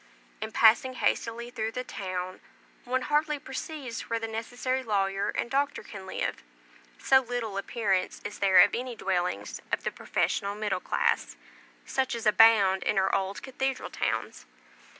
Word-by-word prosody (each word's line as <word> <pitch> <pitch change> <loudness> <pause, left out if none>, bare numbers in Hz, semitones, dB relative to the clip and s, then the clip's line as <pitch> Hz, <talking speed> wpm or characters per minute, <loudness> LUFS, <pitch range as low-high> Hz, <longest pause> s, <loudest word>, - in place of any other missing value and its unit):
In 220 0 -4
passing 235 +4 +5
hastily 235 -1 -1
through 220 -1 -3
the 250 - -3
town, 185 -4 -5 0.4
one 255 +1 0
hardly 300 +2 +1
perceives 270 -2 -6
where 230 - +1
the 225 0 -3
necessary 245 +4 -2
lawyer 195 -4 0
and - - -2
doctor 280 +1 0
can 195 -2 -10
live, - - -3 0.6
so 265 - +5
little 245 -4 -4
appearance 200 -2 -1
is 210 0 -6
there 190 -2 +7
of - - +5
any 245 0 -3
dwellings 180 - -2
of - - 0
the - - -1
professional 200 +1 -1
middle 210 -3 -1
class, - - 0 0.5
such 260 -2 -1
as 230 - -5
abound 210 -3 +6
in 210 - 0
our 190 0 +2
old 195 0 -1
cathedral 265 0 -3
towns. - - -3
225 Hz, 150 wpm, -28 LUFS, 195-255 Hz, 0.6 s, there